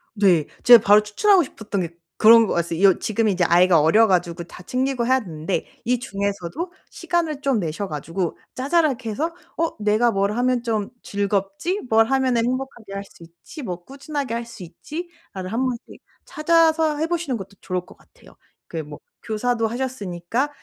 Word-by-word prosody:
네. 180 -7 +3 0.2
제가 240 -3 +9
바로 205 +1 +6
추천하고 360 - +3
싶었던 210 -6 -4
게 170 - -3 0.3
그런 230 +1 +7
거였어요. 170 -2 -1
이 200 - +5
어 190 - +7
지금 220 +1 0
이제 185 -3 +1
아이가 175 -1 +5
어려 215 +9 +5
가지고 175 -2 0
다 180 - -13
챙기고 255 +3 -1
해야 260 0 +4
되는데 165 -4 -4 0.2
이 245 0 +1
중에서도 200 - -4 0.2
시간을 340 -4 -2
좀 270 -6 +1
내셔 175 +4 -3
가지고 165 +3 -4 0.2
자잘하게 270 -4 0
해서 315 +10 -2 0.2
'어 330 0 -1
내가 215 +3 +3
뭘 200 0 +1
하면 250 0 +1
좀 220 -4 -1
즐겁지? 200 - -2
뭘 225 0 +5
하면은 255 -2 +1
행복하게 250 -5 -4
할 200 - -4
수 180 -3 -17
있지? 170 - -12
뭐 180 -6 -5
꾸준하게 275 - -5
할 235 0 -3
수 230 -5 -11
있지?' 315 - -8 0.2
나를 185 -1 -6
한번씩 250 0 -3 0.2
찾아서 320 -1 +2
해 320 +2 0
보시는 330 -7 -2
것도 195 0 -10
좋을 180 -1 -2
것 - - -17
같아요. - - -21 0.3
그 165 - -7
뭐 150 0 -10 0.3
교사도 230 +1 0
하셨으니까 235 -1 -3
225 Hz, 360 characters per minute, -22 LUFS, 190-265 Hz, 0.3 s, 제가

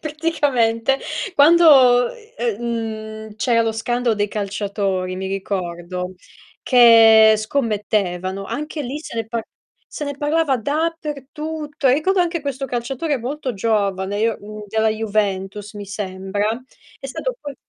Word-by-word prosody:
praticamente 275 -6 0 0.4
quando, 285 -6 +6 0.3
ehm, 235 -4 -1 0.7
mhmm, 210 - -13
c'era 230 +1 +2
lo 225 -1 0
scandalo 240 +1 0
dei 205 0 -1
calciatori, 200 -2 -2
mi 190 +1 -4
ricordo, 180 -2 -4 0.5
che 225 -3 +7
scommettevano, 205 -5 -1
anche 300 +6 -4
lì 270 +3 -4
se 305 - -9
ne 225 -1 -2
par 225 0 -3 0.5
se 295 - -5
ne 285 0 -4
parlava 295 -2 +1
dappertutto. 300 +1 -3
Ricordo 360 +8 +2
anche 340 -1 0
questo 275 -1 -3
calciatore 265 +5 -2
molto 255 +1 -4
giovane, 200 -2 0
io 225 0 +1
mhmm, 215 +1 -9
della 220 +1 +1
Juventus 210 -2 -2
mi 205 -1 -7
sembra, 195 0 -3 0.5
è 270 - -7
stato - - -4
poi 285 -1 -7
225 Hz, 125 wpm, -20 LUFS, 205-285 Hz, 0.7 s, che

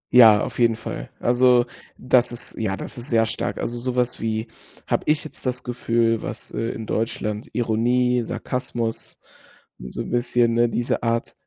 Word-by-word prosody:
Ja, 110 -4 +9
auf - - -5
jeden 115 -1 +4
Fall. 60 - -6
Also 125 0 +4 0.3
das 125 -1 +3
ist 120 +1 -5
ja, 95 -3 -1
das - - -7
ist 125 - -6
sehr 115 -2 +4
stark. 110 - -3
Also 120 +1 -3
so 125 +1 -2
was 125 -2 0
wie 110 0 -1 0.4
habe - - +1
ich 150 +1 +2
jetzt 155 - -9
das 125 0 -2
Gefühl, 115 -2 +1
was, - - -6
äh, 115 - -2
in 110 - -5
Deutschland 105 -1 -2
Ironie, 120 +2 +2
Sarkasmus, 120 -1 -3 0.6
so 60 0 -6
'n - - -8
bisschen 120 -1 +2
ne, 120 0 +3
diese 120 +1 -1
Art 115 0 -1
120 Hz, 175 wpm, -23 LUFS, 115-125 Hz, 0.6 s, Ja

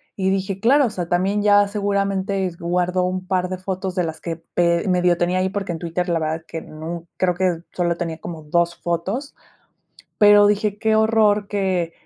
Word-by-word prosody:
y 190 -1 0
dije: 195 0 -2
"Claro", 275 +5 +5
o - - 0
sea, 175 -4 -5
también 190 +4 +1
ya 205 -1 +5
seguramente 200 -1 -1
guardó 180 +1 0
un 185 0 -3
par 185 -1 0
de 185 - -3
fotos 185 0 -4
de 180 -2 +1
las 160 -1 -6
que 165 -1 -4 0.2
pe 170 +1 +2
medio 180 -1 +2
tenía 175 +2 +1
ahí, 185 +1 +1
porque 195 -3 -3
en 165 - -6
Twitter 175 +2 -3
la 170 -2 +1
verdad 160 +1 -3
que 165 - -6
nu 165 +2 -7
creo 180 -1 +2
que 175 -2 0
solo 175 -1 0
tenía 165 -2 -4
como 160 -3 -7
2 170 +3 +1
fotos. 190 - -3 0.8
Pero 205 0 +7
dije: 210 0 0
"Qué 220 0 +2
horror 215 -2 +3
que 185 -5 -1
185 Hz, 195 wpm, -21 LUFS, 170-200 Hz, 0.8 s, Pero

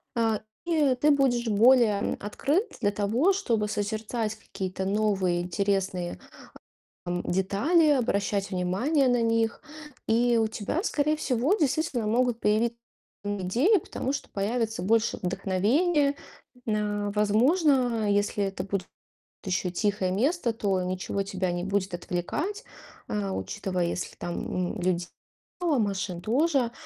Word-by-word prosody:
э, 225 -2 +1 0.3
и 300 -6 +2
ты 295 +4 +2
будешь 255 -4 +2
более, 225 -1 +5
эм, - - -2
открыт 290 - -1
для 205 -1 +2
того, 225 - +2
чтобы 230 - 0
созерцать 215 +1 -2
какие-то 190 -3 -5
новые 195 -4 +1
интересные, 185 -1 -1 0.9
эм, 175 0 -2
детали, 205 - +2
обращать 205 -7 +1
внимание 235 - +1
на 245 -1 +2
них. 225 0 +1 0.5
И 235 +1 +3
у 225 - +3
тебя, 220 - -3
скорее 305 -7 +1
всего, 265 - +1
действительно 295 - 0
могут 240 +2 +1
появит 225 +3 +1 0.5
идеи, 205 - +2
потому 270 -3 -4
что - - -5
появится 220 -1 -2
больше 225 +3 +2
вдохновения. 270 - +1 0.5
Н 210 -1 -1
а, - - -2
возможно, 240 - +3
если 205 0 +1
это 195 -1 -4
буд 195 -1 -2 0.6
ещё 185 -1 -1
тихое 200 0 0
место, 250 - +1
то 195 -4 0
ничего 185 +2 -2
тебя 185 -2 -2
не 175 0 -2
будет 195 0 -1
отвлекать. 305 - -3 0.4
Э, 205 -2 -2
учитывая, 190 -2 -2
если 170 - -4
там 175 +1 -3
н - - -5
людь 175 -1 0 0.5
мало, 315 -7 +2
машин 195 -4 -2
тоже. 265 - +1
215 Hz, 130 wpm, -27 LUFS, 195-255 Hz, 0.9 s, более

